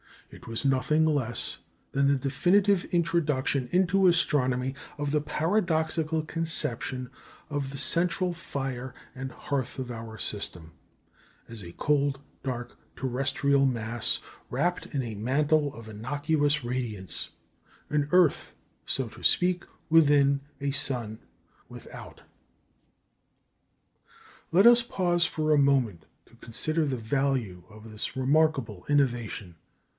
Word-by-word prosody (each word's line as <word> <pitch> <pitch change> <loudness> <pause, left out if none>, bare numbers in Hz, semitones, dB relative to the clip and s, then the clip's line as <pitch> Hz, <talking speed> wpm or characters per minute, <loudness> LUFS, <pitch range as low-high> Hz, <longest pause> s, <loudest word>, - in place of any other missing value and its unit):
It - - -13
was 115 +2 -3
nothing 140 +4 +2
less 135 -7 0 0.3
than 140 0 +2
the 140 - +4
definitive 175 +9 +2
introduction 150 -6 0
into 190 +1 +3
astronomy 130 -6 +2 0.2
of 145 -1 -2
the 150 0 +2
paradoxical 160 -2 0
conception 145 -6 +1 0.4
of 145 -2 -2
the 140 - -7
central 180 +3 +1
fire 135 -5 -5 0.2
and 130 0 -6
hearth 140 -3 -3
of 130 -2 -5
our 115 -1 -7
system 90 -6 -3 0.8
as 115 -2 -7
a 85 -2 -10
cold, 140 +1 +1 0.2
dark, 125 -2 -5 0.2
terrestrial 135 +2 +2
mass, 115 -2 0 0.3
wrapt 175 +8 -1
in 140 -3 -2
a 115 -3 -5
mantle 145 +6 +1
of 115 -1 -11
innocuous 145 +6 0
radiance 120 -6 -3 0.6
an 145 -1 +1
earth, 180 -5 +3 0.3
so 130 -3 0
to - - -14
speak, 180 0 +3 0.2
within 145 -3 +5 0.2
a 140 0 0
sun 120 -5 -2 0.5
without. - - -11 2.3
Let 190 +5 +5
us 240 0 +8
pause 175 -7 +1
for 155 -1 -1
a 150 - +5
moment 130 - +2 0.2
to - - -21
consider 155 +8 -1
the 135 -3 -2
value 120 -6 -1
of 110 +1 -13
this 105 - -5
remarkable 135 - +1
innovation. 120 - 0
140 Hz, 120 wpm, -28 LUFS, 120-155 Hz, 2.3 s, us